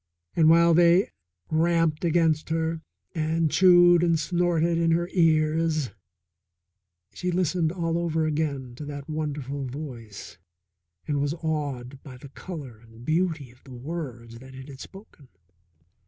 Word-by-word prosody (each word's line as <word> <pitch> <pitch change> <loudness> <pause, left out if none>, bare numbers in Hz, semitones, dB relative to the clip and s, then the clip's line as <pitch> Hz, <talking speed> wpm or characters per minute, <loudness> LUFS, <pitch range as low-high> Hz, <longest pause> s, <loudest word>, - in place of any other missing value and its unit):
And 160 -1 +5
while 170 +1 +6
they 175 +3 +4 0.4
ramped 165 -1 +1
against 165 -2 +1
her 160 0 -1 0.3
and 160 -1 0
chewed 175 -2 +6
and 170 -2 +2
snorted 170 0 +1
in 165 0 +2
her 170 +1 +1
ears, 155 -3 +2 1.2
she 180 - -3
listened 175 -2 0
all 165 -2 -1
over 160 -2 0
again 145 -5 -2
to 150 - -7
that 145 -1 -7
wonderful 145 -3 -4
voice 125 -6 -8 0.7
and 145 -2 0
was 145 +2 -1
awed 140 -5 -4
by 130 -3 -11
the 135 +2 -12
colour 140 - -9
and 115 +1 -16
beauty 160 -5 -1
of 125 - -24
the 130 -2 -11
words 120 -5 -7
that 130 +1 -13
it 130 +2 -10
had 135 -2 -11
spoken. 190 -8 -13
155 Hz, 140 wpm, -25 LUFS, 140-170 Hz, 1.2 s, while